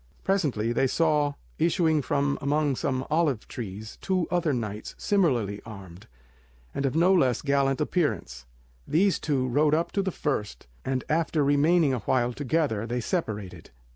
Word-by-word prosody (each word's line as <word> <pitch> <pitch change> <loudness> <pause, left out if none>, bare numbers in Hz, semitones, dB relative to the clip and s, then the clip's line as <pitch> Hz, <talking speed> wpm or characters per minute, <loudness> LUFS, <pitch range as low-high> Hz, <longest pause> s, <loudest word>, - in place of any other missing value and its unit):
Presently 140 - 0
they 135 +3 +2
saw 150 -1 +1 0.2
issuing 160 -1 +2
from 140 +1 0
among 145 0 +1
some 130 0 -2
olive 150 -8 +1
trees 110 -3 -7
two 185 -3 0
other 175 -3 +1
knights 110 -5 -4
similarly 125 - +1
armed, 100 -5 -11 0.7
and 140 - 0
of 135 - -3
no 175 +4 +4
less 130 -9 +2
gallant 140 -2 +1
appearance. 110 - -2 0.4
These 185 +6 +2
two 135 -4 0
rode 150 +4 +3
up 165 +2 -1
to 200 - 0
the 190 - -1
first, 110 - -3 0.2
and 130 -1 -2
after 160 -1 +1
remaining 145 +1 +3
awhile 125 +1 0
together 130 -5 -1
they 120 +1 -2
separated. 110 - -4
140 Hz, 145 wpm, -26 LUFS, 120-160 Hz, 0.7 s, no